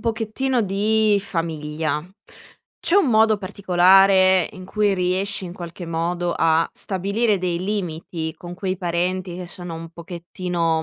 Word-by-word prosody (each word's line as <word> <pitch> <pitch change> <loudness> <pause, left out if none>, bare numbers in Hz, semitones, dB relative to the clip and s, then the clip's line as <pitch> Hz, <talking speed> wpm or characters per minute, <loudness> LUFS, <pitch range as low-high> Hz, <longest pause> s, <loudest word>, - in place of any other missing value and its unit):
pochettino 230 +2 -1
di 210 +2 +2
famiglia, 155 -4 -2 0.8
c'è 350 - +2
un 395 -8 +4
modo 220 -2 +4
particolare 190 -1 +4
in 185 -3 -10
cui 205 +1 +1
riesci 185 +2 -1
in 175 - -7
qualche 175 0 -8
modo 170 +1 -1
a 160 0 +3
stabilire 200 +2 0
dei 180 -1 -2
limiti 165 -5 -3
con 175 +1 -9
quei 185 0 -3
parenti 180 +1 -2
che 180 0 -6
sono 175 -1 -8
un 165 0 -8
pochettino 170 -1 -3
185 Hz, 135 wpm, -22 LUFS, 170-200 Hz, 0.8 s, un